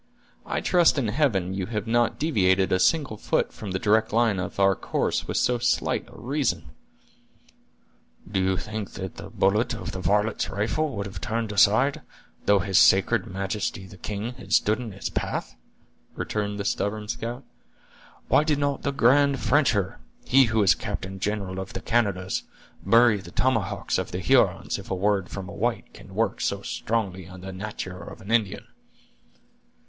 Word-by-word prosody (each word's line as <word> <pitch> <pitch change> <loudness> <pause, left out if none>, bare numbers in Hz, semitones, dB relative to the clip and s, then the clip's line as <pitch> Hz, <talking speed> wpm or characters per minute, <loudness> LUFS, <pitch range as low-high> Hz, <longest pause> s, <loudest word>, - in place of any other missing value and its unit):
I - - -1
trust 175 -4 +4
in 125 -6 0
Heaven 105 - +1
you 95 -1 -3
have 105 -1 -3
not 120 +1 +1
deviated 95 - +2
a 95 - +3
single 140 - +2
foot - - 0
from 105 - -7
the 95 - -1
direct 110 +3 +2
line 110 -3 +2
of 90 - -5
our 95 0 +5
course - - -1
with - - -2
so 125 -1 +2
slight 120 - 0
a - - -13
reason!" 120 - -1 1.6
"Do 95 0 -1
you 95 0 +1
think 105 0 -5
the 95 -1 -7
bullet 110 +5 +1
of 115 - -6
that 95 - -6
varlet's 105 +3 +1
rifle 120 +8 -1
would 100 -1 -3
have 100 +1 -7
turned 115 -2 -2
aside, 110 +7 +4 0.5
though 100 - +6
his 95 0 +2
sacred 100 +2 +4
majesty 95 0 -3
the 95 - -13
king 105 +5 -5
had 125 - -7
stood 105 +2 +3
in 120 -3 -6
its 100 - -5
path?" - - -3 0.6
returned 105 -1 -3
the 100 - -3
stubborn 105 +1 -1
scout. 120 +4 -4 0.8
"Why 150 - +4
did 155 -2 +1
not 145 -1 -1
the 140 - -1
grand 140 +1 +4
Frencher, 120 -10 +1 0.3
he 135 +1 +6
who 110 -2 +2
is 95 - +6
captain 95 -1 -5
general 100 -2 -2
of 95 0 -6
the - - -3
Canadas, 100 -5 0 0.4
bury 115 +2 +5
the 95 -3 -10
tomahawks 100 -4 0
of 95 - -3
the 90 - -4
Hurons, 90 - +2
if - - -11
a 95 - -1
word 100 -1 0
from 95 -2 -6
a - - -8
white - - -2
can - - -13
work - - 0
so - - -1
strongly 95 -6 -2
on 90 0 -11
the 95 0 -7
natur' 95 -1 -6
of - - -10
an 100 +4 -8
Indian?" 110 -5 +1
105 Hz, 175 wpm, -25 LUFS, 95-120 Hz, 1.6 s, though